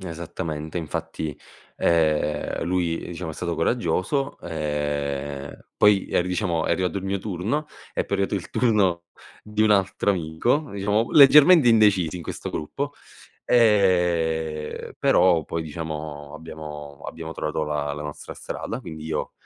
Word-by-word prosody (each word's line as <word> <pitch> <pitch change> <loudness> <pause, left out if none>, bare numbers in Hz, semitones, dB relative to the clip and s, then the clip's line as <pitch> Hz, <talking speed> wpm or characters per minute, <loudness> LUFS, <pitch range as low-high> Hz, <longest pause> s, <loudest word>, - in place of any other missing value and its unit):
N 95 - -8
esattamente, 80 -1 -5
infatti, 80 -2 -4 0.4
ehm, 75 -3 +1
lui 85 -1 0
diciamo 85 -1 -5
è - - -8
stato 85 +1 -3
coraggioso, 115 - 0
ehm, 75 -2 -3
poi 105 -2 +4
ri 90 - +1
diciamo 90 -3 0
è - - 0
arrivato 95 +1 -1
il 95 - -8
mio 95 +1 -1
turno, 105 - -2 0.3
è - - -1
poi 100 - -1
arrivato 100 +1 0
il 95 -4 -4
turno 100 -8 +2 0.4
di 105 0 -1
un 110 - +4
altro 100 0 +2
amico 95 - 0
diciamo 105 +3 0
leggermente 150 +1 +8
indecisi 105 -7 +4
in 90 - -7
questo - - -6
gruppo; 140 - -4 0.5
ehm, 85 -8 +2
però 85 -4 +4
poi 85 - -3
diciamo 75 -2 -6
abbiamo 75 -3 -9
abbiamo 80 0 -6
trovato 75 -1 -2
la 75 -1 -2
la 75 +1 -5
nostra 75 0 -7
strada, - - -5
quindi 80 -1 -8
io, 80 - -3
85 Hz, 140 wpm, -24 LUFS, 75-100 Hz, 0.5 s, leggermente